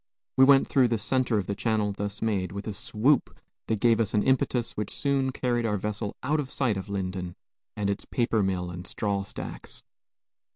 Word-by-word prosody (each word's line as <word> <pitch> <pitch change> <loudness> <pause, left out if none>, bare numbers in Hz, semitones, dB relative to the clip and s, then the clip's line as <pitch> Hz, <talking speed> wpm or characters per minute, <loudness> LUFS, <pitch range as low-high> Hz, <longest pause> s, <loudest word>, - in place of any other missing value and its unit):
We 130 - +7
went 135 0 +6
through 130 -3 +4
the 115 -1 +1
centre 125 +1 +1
of 100 - -1
the 100 - -2
channel 105 0 0
thus 100 +1 -4
made, 95 -5 0
with 100 0 -5
a 110 - -3
swoop 115 +7 +1 0.3
that 110 -2 0
gave 115 0 +4
us 110 -1 0
an 105 - +3
impetus 130 -2 +1
which 105 -1 -4
soon 135 -2 +1
carried 120 -2 0
our 105 -2 +1
vessel 105 +1 -3
out 150 +4 +1
of 140 -3 -3
sight 125 -7 0
of 95 +1 -5
Lyndon 90 -2 -3 0.4
and 105 -1 0
its 100 - -2
paper 115 -3 +1
mill 90 -2 -1
and 90 +1 -7
straw 100 -2 -1
stacks. 95 - -7
105 Hz, 200 wpm, -27 LUFS, 100-125 Hz, 0.4 s, We